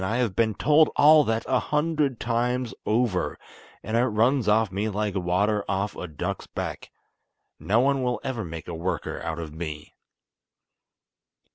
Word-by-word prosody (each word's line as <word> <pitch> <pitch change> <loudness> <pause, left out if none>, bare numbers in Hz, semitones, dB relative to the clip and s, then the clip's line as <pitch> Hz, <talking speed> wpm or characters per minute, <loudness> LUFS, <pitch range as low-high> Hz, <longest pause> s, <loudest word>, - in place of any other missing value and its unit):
I 110 +5 -1
have 120 -7 0
been 110 -2 +1
told 150 +5 +4
all 150 +1 +7
that 110 0 -1
a 130 -1 +2
hundred 150 -4 0
times 120 +1 -1
over; 110 -4 0 0.5
and 110 - -3
it 120 +2 +3
runs 115 +2 +2
off 105 -1 +3
me 100 +3 -1
like 105 0 -2
water 100 +3 +1
off 100 +1 -1
a 90 - -6
duck's 75 -3 -5
back. - - -5 0.7
No 110 +4 +2
one 135 0 +2
will 125 -3 -1
ever 120 -4 -3
make 80 -1 -7
a 85 - -5
worker 85 +1 -3
out 80 0 -4
of 80 -3 -6
me." 75 -2 -7
110 Hz, 160 wpm, -25 LUFS, 95-125 Hz, 0.7 s, all